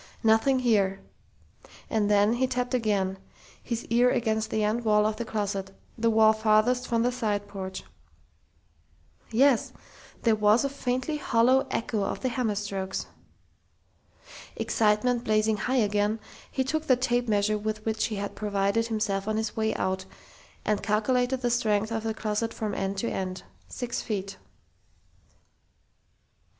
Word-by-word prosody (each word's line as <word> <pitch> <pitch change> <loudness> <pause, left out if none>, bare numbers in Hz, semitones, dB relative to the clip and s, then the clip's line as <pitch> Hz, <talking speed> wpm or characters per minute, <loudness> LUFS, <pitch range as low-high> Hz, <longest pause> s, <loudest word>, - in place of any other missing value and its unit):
Nothing 225 +4 +4
here.... 200 -5 +2 0.9
And 215 -2 0
then 205 +1 +4
he 255 +2 +1
tapped 250 -1 -2
again, 200 -5 0 0.4
his 235 -2 -4
ear 240 +2 +5
against 220 -3 0
the 220 -1 0
end 220 +3 0
wall 210 -1 +3
of 215 0 0
the 235 - -3
closet 200 -3 -3 0.2
the 230 -1 +1
wall 220 -1 +5
farthest 220 +3 +2
from 230 -1 +1
the 245 - +2
side 210 -5 -2
porch.... 190 -2 -6 1.5
Yes! 250 +1 +3 0.5
There 230 - +4
was 210 +4 +3
a - - 0
faintly 260 +2 -2
hollow 255 0 +3
echo 220 -2 -1
of - - -3
the 260 - 0
hammer 235 -4 -1
strokes! 195 -2 -3 1.5
Excitement 230 +3 +1
blazing 215 -1 +2
high 255 +5 -1
again, 210 -1 +1 0.3
he 265 - 0
took 310 +4 -2
the 255 - +6
tape 245 -1 0
measure 210 0 +1
with 215 0 -4
which 220 0 0
he 220 - -3
had 200 0 -4
provided 205 +2 0
himself 210 -3 -1
on 215 0 0
his 220 -1 -2
way 220 0 +1
out, 190 0 -2 0.6
and 210 -1 +1
calculated 245 +4 +1
the 240 0 +2
length 215 +1 +1
of 225 -1 -1
the 220 0 -3
closet 220 +1 -2
from 215 -2 -3
end 195 0 -2
to 235 - -1
end. 185 -3 -4 0.2
Six 245 -1 -4
feet.... 195 -3 -4
220 Hz, 150 wpm, -27 LUFS, 205-240 Hz, 1.5 s, the